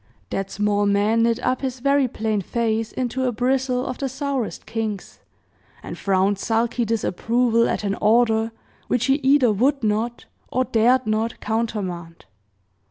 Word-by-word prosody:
That 195 0 -2
small 205 0 +1
man 205 +3 +2
knit 230 0 +2
up 255 - 0
his 260 -2 -3
very 275 +1 +2
plain 220 -3 -2
face 225 +2 -1
into 260 +1 -2
a 250 - +1
bristle 255 +2 0
of 255 - -5
the 275 - -2
sourest 270 -3 -3
kinks, 220 -4 -4 0.6
and - - -6
frowned 195 0 +1
sulky 230 +2 0
disapproval 230 +2 +1
at - - -2
an 200 -1 0
order 225 0 +3 0.4
which 245 0 +1
he 270 +1 +3
either 270 -4 +4
would 260 +6 +1
not, 220 +3 -1 0.3
or 255 - +2
dared 245 +3 +3
not, 220 +1 -1
countermand. 195 -7 -3
230 Hz, 150 wpm, -22 LUFS, 215-255 Hz, 0.6 s, either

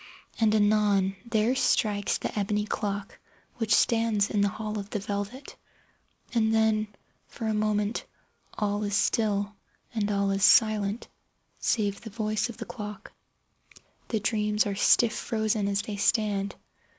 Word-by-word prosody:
And, 220 -1 +3
anon, 205 -2 +3
there 225 +1 +1
strikes 205 -5 +1
the - - -5
ebony 210 0 0
clock 200 -1 -4 0.4
which 225 -3 +2
stands 225 -3 +2
in 205 - +1
the 200 - +3
hall 215 0 -4
of 200 0 -7
the 210 - -2
velvet. 205 +7 -5 0.8
And 220 -2 +2
then, 220 -1 +2 0.4
for 225 - -7
a 220 - 0
moment, 210 +1 0 0.5
all 205 0 -1
is 205 -1 -1
still, 205 -2 +1 0.4
and 210 -2 -1
all 200 -1 +1
is 195 0 -1
silent 215 0 +4 0.5
save 205 -3 0
the 225 - -8
voice 215 +1 -1
of 235 - -8
the - - -6
clock. 210 -3 -8 1.0
The 220 - -1
dreams 210 0 +1
are 205 - -1
stiff 220 +3 +4
frozen 220 -3 -1
as 200 0 0
they 205 -2 -5
stand. 200 -1 +1
210 Hz, 145 wpm, -27 LUFS, 205-220 Hz, 1.0 s, silent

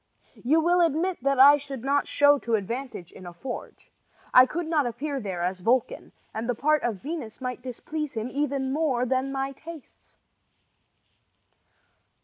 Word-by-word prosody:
You 300 +7 +3
will 350 +2 +3
admit 335 +3 +1
that 275 0 +1
I 285 +2 +9
should 275 -4 -8
not 280 +1 +1
show 290 0 +4
to 235 -3 0
advantage 220 -3 -5
in 185 - -12
a 175 - -9
forge. 245 +8 -8 0.4
I 255 0 +8
could 340 +5 -3
not 310 -5 +1
appear 275 +4 -3
there 190 -6 -4
as 185 +1 -2
Vulcan, 235 +6 0 0.2
and 225 +2 -4
the 245 - +1
part 305 +5 +2
of 220 -6 -3
Venus 295 -7 -6
might 250 -2 -5
displease 290 +4 -5
him 225 0 -3
even 275 -1 -1
more 275 -5 +1
than 260 +2 0
my 270 0 -2
tastes. 315 +1 -13
270 Hz, 160 wpm, -26 LUFS, 240-295 Hz, 0.4 s, I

